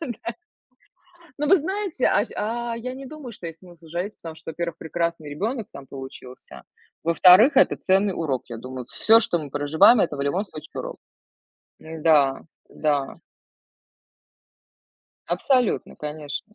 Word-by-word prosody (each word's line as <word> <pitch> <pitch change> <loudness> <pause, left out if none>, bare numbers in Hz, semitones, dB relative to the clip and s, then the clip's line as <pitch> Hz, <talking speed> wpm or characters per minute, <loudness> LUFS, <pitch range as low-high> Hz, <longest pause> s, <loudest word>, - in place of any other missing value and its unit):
Да. 240 -6 -5 1.1
Но 295 - +1
вы 385 - +6
знаете, 375 -3 -1
а 200 - +3
щ - - -14
а, 235 +2 -2
я 255 +2 -5
не 270 0 -9
думаю, 285 -5 -9
что 175 - -9
есть 165 0 -9
смысл 175 -3 -16
жалеть, 175 +6 -4
потому 165 -1 -9
что, 160 - -8
во-первых, 170 0 -4
прекрасный 165 -1 -3
ребёнок 215 - -3
там 140 -1 -10
получился. 130 - -10 0.4
Во-вторых, 180 - +6
это - - +5
ценный 195 +1 +2
урок, 145 -7 -2
я 115 - -6
думаю. 130 0 -7
Всё, 225 - +4
что 225 -7 0
мы 150 -3 -6
проживаем- 145 - +5
это 150 -6 0
в - - -2
любом 170 +9 0
случае 155 -6 -10
урок. - - -7 0.8
Н-да, 155 -4 +2 0.3
да. 145 -3 -1 2.1
Абсолютно, 230 +7 +1
конечно. 150 +6 -6
170 Hz, 145 wpm, -24 LUFS, 150-230 Hz, 2.1 s, вы